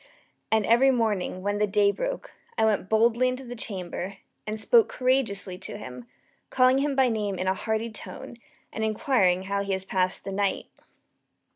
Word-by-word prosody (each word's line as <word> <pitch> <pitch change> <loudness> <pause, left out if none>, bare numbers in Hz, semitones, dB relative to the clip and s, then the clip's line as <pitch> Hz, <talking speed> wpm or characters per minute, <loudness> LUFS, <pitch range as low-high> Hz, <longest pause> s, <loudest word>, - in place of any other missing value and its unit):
And 220 -2 +3
every 240 +4 +5
morning, 210 -7 0
when 205 +1 -1
the 210 - +2
day 200 0 +3
broke, - - -4 0.3
I - - +3
went 205 -3 0
boldly 235 +3 +3
into 255 +1 -3
the 245 -1 -8
chamber, 195 -3 -4 0.3
and 215 +1 -3
spoke 455 - +4
courageously 225 -8 0
to - - -6
him, 125 -1 -9 0.4
calling 255 +1 +4
him 280 0 0
by 265 -1 +4
name 210 -4 -2
in 185 - -2
a 190 - +2
hearty 220 +3 -2
tone, 230 - -9 0.4
and 220 - -3
inquiring 215 - +2
how 200 +1 -1
he 200 -1 -2
has 190 0 -2
passed 185 -1 0
the 195 - -5
night. 200 0 -1
215 Hz, 175 wpm, -26 LUFS, 195-250 Hz, 0.4 s, every